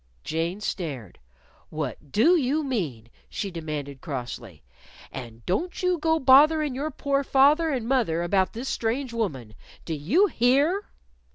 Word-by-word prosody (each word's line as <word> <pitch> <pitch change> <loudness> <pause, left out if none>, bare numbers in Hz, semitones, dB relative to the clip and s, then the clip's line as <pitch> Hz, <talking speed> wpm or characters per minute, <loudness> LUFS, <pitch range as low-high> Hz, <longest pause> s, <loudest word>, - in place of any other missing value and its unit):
Jane 170 +5 -2
stared. 145 - -5 0.5
"What 145 -2 -5
do 315 - +5
you 300 0 +1
mean?" 155 - -3 0.2
she 200 - -4
demanded 150 -5 -6
crossly. 120 - -6 0.5
"And 115 -3 -9
don't 345 - -2
you 365 -2 +1
go 320 +1 +2
botherin' 295 +2 +5
your 285 +4 -3
poor 280 -1 -1
father 290 +5 +4
and 250 -6 -2
mother 220 -11 +1
about 190 +2 +1
this 240 +4 -5
strange 235 +2 -2
woman. 135 - -3 0.3
Do 165 - -3
you 220 - +3
_hear? 280 - +2
225 Hz, 135 wpm, -25 LUFS, -, 0.5 s, do